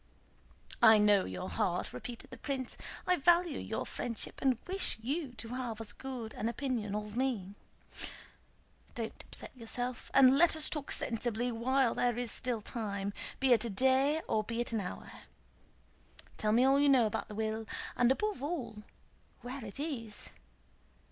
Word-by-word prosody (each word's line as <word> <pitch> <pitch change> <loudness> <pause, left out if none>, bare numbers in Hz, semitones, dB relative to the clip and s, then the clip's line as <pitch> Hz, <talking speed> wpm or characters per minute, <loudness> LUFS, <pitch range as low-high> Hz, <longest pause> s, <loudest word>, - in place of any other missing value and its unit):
"I 220 0 +9
know 210 -2 +5
your 90 -1 -5
heart," - - -1
repeated 235 - -7
the 255 - -8
prince. 260 0 -4 0.3
"I 365 0 +3
value 345 0 +4
your 220 - -3
friendship 235 -3 -4
and 265 -3 +3
wish 380 +1 0
you 275 +3 -2
to 225 -1 -8
have 245 -3 -4
as 210 -2 -3
good 250 -4 -6
an 220 - -2
opinion 235 -5 -2
of 210 0 -4
me. 235 -7 -1 1.4
Don't - - -4
upset - - -5
yourself, 245 +1 -4
and 270 0 +7
let 340 -1 +6
us 310 -1 +3
talk 300 -3 -3
sensibly 235 +1 0
while 245 +1 +2
there 240 -1 +1
is 245 -2 -1
still 240 -3 -1
time, 200 -3 -3 0.3
be 265 -2 +5
it 225 - +3
a 235 - -2
day 265 +8 +3
or 215 - +1
be 230 +2 -4
it 240 - 0
but - - -5
an 225 - +1
hour.... 180 - -6 1.3
Tell 215 - +1
me 235 +3 +5
all 270 +1 +5
you 285 0 +5
know 260 -4 +6
about 215 - -2
the 210 - -8
will, 220 0 -2 0.3
and 245 0 +4
above 420 +4 0
all 255 -9 -4 0.6
where 250 +1 -6
it 215 +4 -7
is. 240 -9 -5
245 Hz, 170 wpm, -33 LUFS, 220-270 Hz, 1.4 s, I